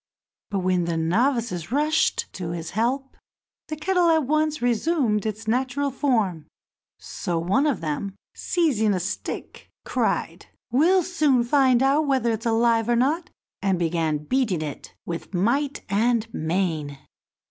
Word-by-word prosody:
But 195 -2 -1
when 180 -1 +1
the 170 -1 -1
novices 215 - 0
rushed 305 +3 +1
to 175 -3 -5
his 165 -1 -5
help, 255 +6 -1 0.5
the 310 - -4
kettle 355 +2 +2
at 320 -3 +3
once 310 +2 +1
resumed 240 - +1
its 215 +1 -5
natural 260 +4 0
form; 220 - 0 0.5
so 175 -1 -4
one 195 - +1
of 280 - 0
them, 165 +5 -3 0.2
seizing 235 - +1
a - - -1
stick, 185 +4 -5 0.2
cried, - - -1 0.2
"We'll 345 +9 +4
soon 300 -8 +2
find 260 0 +3
out 285 +3 +3
whether 260 -4 +2
it's 225 +1 -2
alive 230 0 +2
or 240 - +3
not," 295 +8 +1 0.3
and 195 -2 +1
began 165 -2 0
beating 210 - 0
it 145 -3 -8
with 170 +2 -6
might 275 +10 0
and 225 +3 +1
main. 160 -4 -2
235 Hz, 140 wpm, -24 LUFS, 185-280 Hz, 0.5 s, We'll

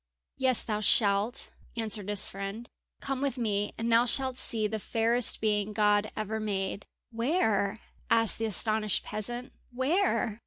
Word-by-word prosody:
"Yes, 260 -2 +5
thou 210 -2 -2
shalt," 210 +2 +1 0.3
answered 215 -3 -1
his 205 -2 +2
friend. 200 +4 -6 0.3
"Come 270 -1 -3
with 275 -2 -1
me 205 -3 -1
and 230 +1 -2
thou 230 +1 +5
shalt 260 +1 +1
see 225 -3 0
the 215 +1 -2
fairest 230 +3 +1
being 210 -1 0
God 210 0 +2
ever 215 +1 -3
made!" 200 -2 -3 0.2
"Where?" 225 - 0 0.3
asked 225 -1 +4
the 225 - 0
astonished 215 0 +1
peasant, 240 +5 -5 0.2
"where?" 260 - 0
220 Hz, 145 wpm, -29 LUFS, 210-240 Hz, 0.3 s, Yes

